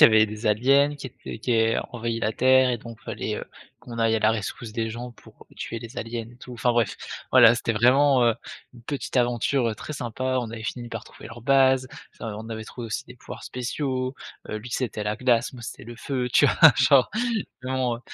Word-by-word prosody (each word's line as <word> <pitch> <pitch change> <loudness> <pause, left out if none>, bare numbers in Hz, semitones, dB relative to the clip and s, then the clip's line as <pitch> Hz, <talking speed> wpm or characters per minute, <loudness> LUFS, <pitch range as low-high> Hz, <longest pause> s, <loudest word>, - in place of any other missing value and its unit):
y - - +11
avait 110 -1 +5
des 110 +1 -6
aliens 140 +7 +3
qui 140 - -7
étaient 115 - -9
qui 120 +2 -1
aient 115 0 +3
envahit 115 -1 -3
la 110 - 0
terre 130 +1 +4
et 120 - 0
donc 115 0 -11
fallait - - -4
heu, - - -5 0.3
qu'on 115 -1 -9
aille 115 0 +3
à - - +1
la 110 +1 +3
rescousse 110 +2 -5
des 110 0 -2
gens 120 +2 -7
pour - - -18
tuer 115 - -5
les 115 +3 -10
aliens 115 0 -4
et 120 - -16
tout. 125 0 -11
Enfin 120 +1 +1
bref, 120 -3 +1 0.3
voilà 120 -2 +8
c'était 115 0 -1
vraiment 130 +3 +4
heu, 115 - +3 0.4
une 120 - -14
petite 140 +1 -4
aventure 120 -1 +1
très 150 - -7
sympa. 130 0 -2
On 115 - -5
avait 110 -1 -7
fini 120 0 -4
par 115 -2 -6
trouver - - -12
leur 120 +1 -10
base, 130 0 +4 0.3
ça - - -8
v 105 - -4
on 110 +1 -8
avait 110 -1 -5
trouvé 120 +2 -8
aussi - - -3
des 125 - -13
pouvoirs 125 - -10
spéciaux, 130 +1 -3 0.3
heu, 110 - -3
lui 115 +3 -10
c'était 115 -5 -2
la 105 - -1
glace, 120 0 +1
moi, 120 -2 -11
c'était 115 - -8
le 120 - -9
feu. 125 +1 -3
Tu - - +6
vois? - - +1 0.2
Genre, 135 -2 +5 0.6
mais 130 - -3
bon, 125 -3 0
120 Hz, 230 wpm, -25 LUFS, 115-130 Hz, 0.6 s, y